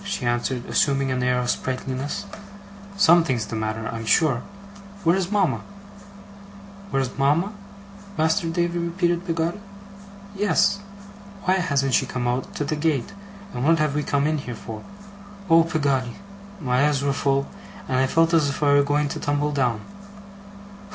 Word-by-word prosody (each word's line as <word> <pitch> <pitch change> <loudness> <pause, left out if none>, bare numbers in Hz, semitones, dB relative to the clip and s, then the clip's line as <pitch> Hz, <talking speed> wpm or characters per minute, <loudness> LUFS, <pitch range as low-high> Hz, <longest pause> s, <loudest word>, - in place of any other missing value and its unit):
she 200 -10 -3
answered, 120 +1 -1
assuming 135 -1 +1
an 130 0 -1
air 125 0 +2
of 125 - -2
sprightliness. 130 +2 -3 0.7
'Something's 160 - +4
the 110 - -6
matter, 110 0 -3
I'm 115 -1 -5
sure. 135 -6 +3 0.6
Where's 175 +2 +2
mama?' 195 -9 +1 1.3
'Where's 135 -6 -1
mama, 155 +9 +2 0.6
Master 160 +3 +1
Davy?' 170 +1 0
repeated 175 +1 -1
Peggotty. 165 +3 -1 0.8
'Yes. 200 0 +2 0.6
Why 185 +1 +3
hasn't 140 -7 0
she - - +3
come 125 -1 -2
out 125 +1 -2
to 145 - -2
the 155 - -1
gate, 150 +1 -1 0.4
and 125 - -3
what 165 +3 +4
have 155 -2 +1
we 150 - 0
come 140 -1 0
in 155 0 +1
here 125 -3 -6
for? 110 -1 -8 0.7
Oh, 165 0 +8
Peggotty!' 135 -6 0 0.4
My 130 -3 +1
eyes 140 -2 -1
were 140 -1 +1
full, 140 0 +1 0.4
and 130 - +1
I 130 - +3
felt 165 +4 +2
as 155 -4 +4
if 140 - -3
I 145 -1 +4
were 145 - +6
going 145 +1 +1
to - - -4
tumble 145 +1 0
down. 125 -6 0
145 Hz, 155 wpm, -23 LUFS, 130-165 Hz, 1.3 s, Oh